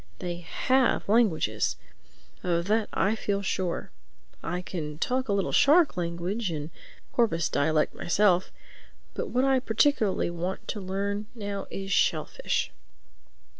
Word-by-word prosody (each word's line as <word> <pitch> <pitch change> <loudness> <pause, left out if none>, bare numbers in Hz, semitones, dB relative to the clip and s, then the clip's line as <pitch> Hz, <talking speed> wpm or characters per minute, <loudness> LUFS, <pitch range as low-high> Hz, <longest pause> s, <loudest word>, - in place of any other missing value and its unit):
They 175 - -4
have 255 +8 +1
languages, 210 -6 +2 0.7
of 170 -1 0
that 215 0 +2
I 200 - +2
feel 200 -2 -2
sure. 185 -2 -2 0.5
I 180 +1 -3
can 150 -5 -5
talk 255 +7 -1
a - - +2
little 200 -1 +1
shark 305 0 +5
language 175 +4 -2
and 155 -1 -4 0.4
porpoise 220 - +2
dialect 155 +1 +1
myself. 185 0 +2 0.6
But - - -4
what 255 +2 +2
I 270 -1 +4
particularly 220 -6 +2
want 175 +2 -4
to 210 - -3
learn 200 +2 -2
now 200 -3 -4
is 195 0 -5
shellfish." - - +1
195 Hz, 130 wpm, -27 LUFS, 175-225 Hz, 0.7 s, shark